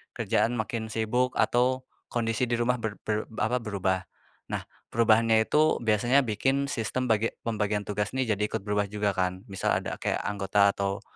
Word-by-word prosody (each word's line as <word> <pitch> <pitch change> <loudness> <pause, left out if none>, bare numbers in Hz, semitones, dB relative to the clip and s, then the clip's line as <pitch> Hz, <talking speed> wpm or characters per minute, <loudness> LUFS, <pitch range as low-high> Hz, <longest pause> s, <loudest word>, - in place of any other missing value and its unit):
kerjaan 120 - +1
makin 110 -1 -3
sibuk 115 +3 0
atau 130 +1 +2 0.2
kondisi 115 +1 0
di 120 - -2
rumah 120 +1 +1
ber 110 -2 -3
ber 110 0 -1 0.2
apa, 115 +4 +2
berubah. 100 -4 -1 0.5
Nah, - - -2 0.3
perubahannya 115 -1 +4
itu, 155 +3 +2
biasanya 120 +5 +3
bikin 135 +5 0
sistem 130 +1 -2
bagi 110 +1 +1
pembagian 105 -2 -1
tugas 105 +2 -2
nih 130 -4 0
jadi - - -5
ikut 110 -1 -3
berubah 105 0 0
juga 105 0 0
kan? 90 0 -1
Misal 95 - 0
ada - - -4
kayak - - -1
anggota 100 0 +2
atau 100 0 -2
110 Hz, 165 wpm, -27 LUFS, 105-120 Hz, 0.5 s, perubahannya